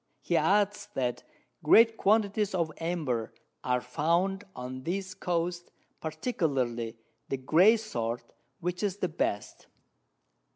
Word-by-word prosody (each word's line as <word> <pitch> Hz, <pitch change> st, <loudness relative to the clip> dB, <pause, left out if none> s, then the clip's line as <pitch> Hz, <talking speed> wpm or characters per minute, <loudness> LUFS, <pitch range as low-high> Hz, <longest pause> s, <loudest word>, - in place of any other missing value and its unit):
He -, -, -1 dB
adds, 205 Hz, +1 st, +2 dB
that 125 Hz, -2 st, -1 dB, 0.4 s
great 225 Hz, +8 st, +6 dB
Quantities 210 Hz, -1 st, +2 dB
of 165 Hz, -3 st, 0 dB
Amber 155 Hz, -9 st, -2 dB, 0.3 s
are 125 Hz, -1 st, +1 dB
found 170 Hz, +9 st, 0 dB
on 125 Hz, +1 st, -6 dB
this 185 Hz, +5 st, -3 dB
Coast, 175 Hz, 0 st, -2 dB, 0.3 s
particularly, 135 Hz, -, -2 dB, 0.3 s
the 135 Hz, -, -1 dB
grey 175 Hz, -, +5 dB
sort, 120 Hz, -, -3 dB, 0.4 s
which 180 Hz, +1 st, -3 dB
is 200 Hz, -2 st, -1 dB
the 185 Hz, -3 st, -1 dB
best. 105 Hz, -10 st, -3 dB
170 Hz, 115 wpm, -29 LUFS, 130-195 Hz, 0.4 s, great